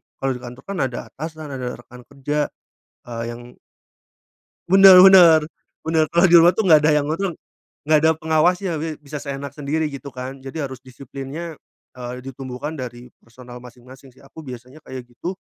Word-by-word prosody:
kalau 135 0 -2
di 125 - -5
kantor 125 +1 -11
kan 200 -1 -6
ada 120 - -7
atasan 155 +1 -8
ada 130 -3 -5
rekan 125 0 -14
kerja, 145 +2 -2 0.6
eee, 115 -1 -6
yang 120 +1 -9 1.3
Bener 190 0 +9
bener, 180 -4 +8 0.4
bener 160 -1 +1
kalo 170 +2 +3
di 175 - +7
rumah 170 +1 +7
tuh 210 -2 -1
nggak 155 -2 +7
ada 155 - +5
yang 145 - -4
ngatur. 175 +3 -2 0.5
Nggak 155 +1 +3
ada 160 +1 +3
pengawasnya 160 +2 0
bi 160 -1 -4
bisa 145 0 -9
seenak 140 -1 -6
sendiri 150 +2 -2
gitu 140 0 -9
kan 130 0 -8
jadi 135 +4 -6
harus 130 -2 -7
disiplinnya, 140 +5 -9 0.4
eee, 125 +1 -7
ditumbuhkan 135 +3 -7
dari 125 0 -8
personal 125 +1 -13
masing-masing 125 +2 -15
sih - - -21
aku 135 - -14
biasanya 130 0 -11
kayak 130 -1 -7
gitu. 125 +10 -7
140 Hz, 170 wpm, -21 LUFS, 125-160 Hz, 1.3 s, Bener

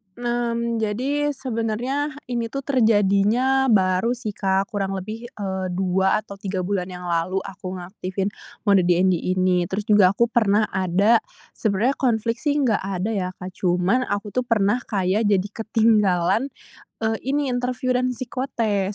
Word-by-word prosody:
Nah 240 -1 -1
mmm, 235 0 -1
jadi 275 +7 -1
sebenernya, 250 +3 -2 0.2
ini 235 -1 -1
tuh 275 +4 -5
terjadinya 230 +1 +3
baru 195 0 +2
sih, 240 -3 -5
Kak, 195 +1 0
kurang 195 -3 -2
lebih, 215 +5 -6
eee, 190 -5 -4
2 190 +2 +1
atau 200 -1 -11
3 190 -2 -3
bulan 185 -1 -1
yang 180 -1 -8
lalu 175 +2 -1
aku 190 -1 -7
ngaktifin 185 +2 -4 0.3
mode 200 -4 +4
DND 180 +1 +3 0.2
ini. 185 -1 +2
Terus 195 +4 -3
juga 200 -2 +6
aku 235 +3 +2
pernah 215 -2 +2
ada 190 +5 +3 0.3
sebenarnya 220 +6 0
konflik 230 -2 0
sih 290 +3 0
nggak 225 -5 +2
ada 190 +2 -3
ya, 195 -4 -1
Kak, 185 0 -9
cuman 185 +7 +1
aku 205 0 -3
tuh 250 +3 -1
pernah 210 0 +2
kayak 200 +1 0
jadi 200 -1 +2
ketinggalan, 215 -1 +2 0.6
eee, 220 0 0
ini 280 0 0
interview 250 +1 -2
dan 250 0 +1
psikotes. 230 -6 -2
210 Hz, 150 wpm, -23 LUFS, 190-240 Hz, 0.6 s, juga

